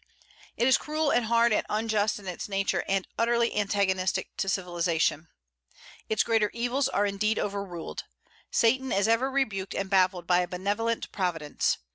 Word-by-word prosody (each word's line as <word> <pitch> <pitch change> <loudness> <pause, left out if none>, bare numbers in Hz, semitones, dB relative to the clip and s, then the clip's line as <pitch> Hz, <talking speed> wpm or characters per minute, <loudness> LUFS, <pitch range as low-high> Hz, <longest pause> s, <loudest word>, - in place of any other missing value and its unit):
It 240 - +2
is 260 - +5
cruel 305 0 -1
and 245 - +2
hard 235 0 +4
and - - +2
unjust 215 -1 0
in 200 -2 -11
its 180 +3 -5
nature, 195 0 0
and 195 -1 0
utterly 235 0 +2
antagonistic 195 -2 0
to 195 - -1
civilization. 170 -4 0 0.8
Its 215 -2 +2
greater 225 -2 +2
evils 245 +3 0
are 205 - +1
indeed 215 +2 0
overruled; 200 -4 -4 0.4
Satan 260 +3 +2
is 200 +2 +2
ever 230 +4 +2
rebuked 215 -9 -2
and 195 0 -3
baffled 185 -2 +2
by 175 0 +3
a 180 - 0
benevolent 205 +6 -2
Providence. 165 -6 -1
205 Hz, 155 wpm, -27 LUFS, 190-230 Hz, 0.8 s, is